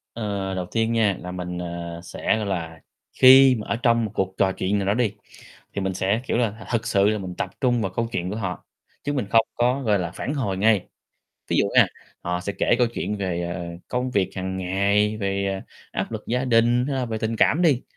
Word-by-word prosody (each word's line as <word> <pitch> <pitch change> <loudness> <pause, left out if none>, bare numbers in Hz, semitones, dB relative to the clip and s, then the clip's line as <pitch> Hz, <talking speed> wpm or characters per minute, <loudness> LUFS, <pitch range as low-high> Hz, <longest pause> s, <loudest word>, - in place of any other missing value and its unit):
Ờ, 100 -4 -3
đầu 90 -1 -2
tiên 115 0 +1
nha, 105 -5 +2
là 90 +1 -6
mình, 90 -1 -5
ờ, 85 -1 -5
sẽ, 110 - -1
gọi 110 - -2
là, 80 -5 -4 0.3
khi 130 0 +8
mà 105 - -6
ở - - 0
trong 115 -1 +2
một 105 - -5
cuộc 95 0 -1
trò 95 -1 +3
chuyện 95 +2 -1
nào 95 - -2
đó 100 - +3
đi, 110 -3 +1 0.6
thì 100 - -2
mình 95 0 -2
sẽ, 95 +4 0
kiểu - - 0
là, 115 -2 -1
thực 115 -1 0
sự 100 -2 +3
là 105 0 +1
mình 95 -2 -6
tập - - -2
trung 120 -3 +2
vào 95 -2 -2
câu 115 0 0
chuyện 90 -4 -2
của 105 - -4
họ, 95 -4 -4 0.4
chứ 145 - -1
mình 135 -8 -1
không 115 +1 +5
có, 125 +3 +1
gọi 105 -5 +2
là, 85 -2 -2
phản 145 - -3
hồi 110 -9 -1
ngay. 105 0 +2 0.6
Ví - - +1
dụ - - +4
nghe, - - +7 0.4
họ 90 0 -2
sẽ 100 +2 -4
kể - - +3
câu 125 - +4
chuyện 110 -2 -3
về, 90 -4 -2
ờ, 85 - -5 0.2
công 125 +1 -1
việc 100 -6 +1
hằng 95 0 -3
ngày, 100 +3 +1
về, 100 -1 -1
ờ, 95 0 -2 0.3
áp - - -3
lực - - -5
gia 125 +2 0
đình, 120 0 +3
hay 140 -1 -2
là 130 - 0
về 110 -1 -3
tình 110 +1 -2
cảm 155 +9 +3
đi, 145 -7 +3
105 Hz, 240 wpm, -24 LUFS, 95-115 Hz, 0.6 s, khi